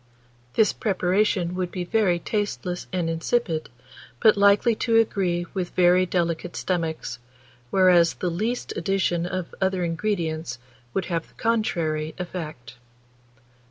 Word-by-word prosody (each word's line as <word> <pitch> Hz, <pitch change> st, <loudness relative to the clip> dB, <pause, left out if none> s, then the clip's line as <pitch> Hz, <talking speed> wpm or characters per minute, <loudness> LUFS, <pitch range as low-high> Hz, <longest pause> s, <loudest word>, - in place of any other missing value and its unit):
This 220 Hz, -, +4 dB
preparation 185 Hz, -2 st, +1 dB
would 180 Hz, -1 st, -2 dB
be 180 Hz, -, -3 dB
very 185 Hz, -1 st, +2 dB
tasteless 185 Hz, -2 st, -3 dB
and 180 Hz, -3 st, -1 dB
insipid, 165 Hz, 0 st, -1 dB, 0.5 s
but 215 Hz, -, +6 dB
likely 200 Hz, +3 st, +5 dB
to 230 Hz, -1 st, +2 dB
agree 185 Hz, -6 st, +1 dB
with 185 Hz, -3 st, -2 dB
very 180 Hz, +1 st, +4 dB
delicate 170 Hz, -1 st, -1 dB
stomachs, 165 Hz, -7 st, -2 dB, 0.5 s
whereas 180 Hz, -2 st, +5 dB
the 180 Hz, -, -2 dB
least 220 Hz, +8 st, -2 dB
addition 175 Hz, -3 st, 0 dB
of 185 Hz, -1 st, -4 dB
other 190 Hz, -1 st, +1 dB
ingredients 165 Hz, -6 st, -2 dB, 0.4 s
would 190 Hz, -, 0 dB
have 170 Hz, -2 st, -2 dB
the -, -, -26 dB
contrary 165 Hz, -9 st, -1 dB
effect. 155 Hz, -10 st, -7 dB
180 Hz, 125 wpm, -24 LUFS, 170-200 Hz, 0.5 s, but